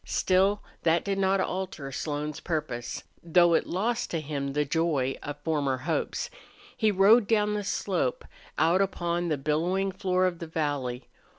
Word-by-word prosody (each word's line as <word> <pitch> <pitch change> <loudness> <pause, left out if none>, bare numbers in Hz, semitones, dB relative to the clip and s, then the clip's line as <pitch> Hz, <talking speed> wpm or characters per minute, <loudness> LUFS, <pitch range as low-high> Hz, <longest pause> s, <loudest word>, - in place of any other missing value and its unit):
Still 195 +2 +2 0.2
that 165 0 +2
did 195 -1 -1
not 195 0 +2
alter 185 -8 -3
Slone's 150 +1 -3
purpose, 145 -8 -3 0.2
though 170 0 +4
it - - +2
lost 230 +6 -1
to 165 - -1
him 140 -2 -3
the 150 +1 +1
joy 145 -4 0
of 145 0 -6
former 145 -5 0
hopes. 480 - -2 0.4
He 220 - +2
rode 205 +3 +5
down 210 -1 +2
the 210 0 -2
slope, 185 -9 -1 0.3
out 165 +5 +4
upon 175 -3 -1
the 155 -3 0
billowing 175 +7 0
floor 185 -1 +1
of 175 -2 -1
the 170 - -6
valley. 145 -6 -2
170 Hz, 160 wpm, -28 LUFS, 145-190 Hz, 0.4 s, rode